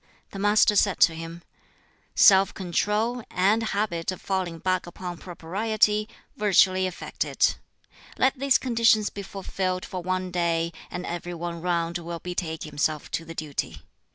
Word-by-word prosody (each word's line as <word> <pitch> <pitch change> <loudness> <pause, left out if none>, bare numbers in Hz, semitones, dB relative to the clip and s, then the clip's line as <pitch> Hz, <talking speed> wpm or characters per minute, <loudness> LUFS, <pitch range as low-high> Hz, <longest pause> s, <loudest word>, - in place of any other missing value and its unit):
The 195 - -7
Master 210 +1 +4
said 200 -1 +3
to 165 - +6
him, 165 +1 -8 0.7
"Self 195 -1 +6
control, 210 +6 0
and 200 +5 +2
a - - -2
habit 200 -6 -1
of 185 - -7
falling 185 -4 -2
back 185 +1 -1
upon 175 -1 -7
propriety, 210 +5 0 0.3
virtually 190 -2 +4
effect 180 - -4
it. - - +1 0.6
Let 260 +1 +2
these 275 -1 +4
conditions 230 -4 +3
be 200 - -6
fulfilled 185 -1 -3
for 185 - -5
one 185 +1 -2
day, 170 -1 0 0.2
and 180 - -5
every 175 0 -5
one 170 0 -5
round 170 -1 -1
will 170 0 -5
betake 165 -2 -4
himself 150 0 -2
to 165 - -2
the 165 0 -9
duty. 140 - -4
185 Hz, 155 wpm, -26 LUFS, 170-205 Hz, 0.7 s, to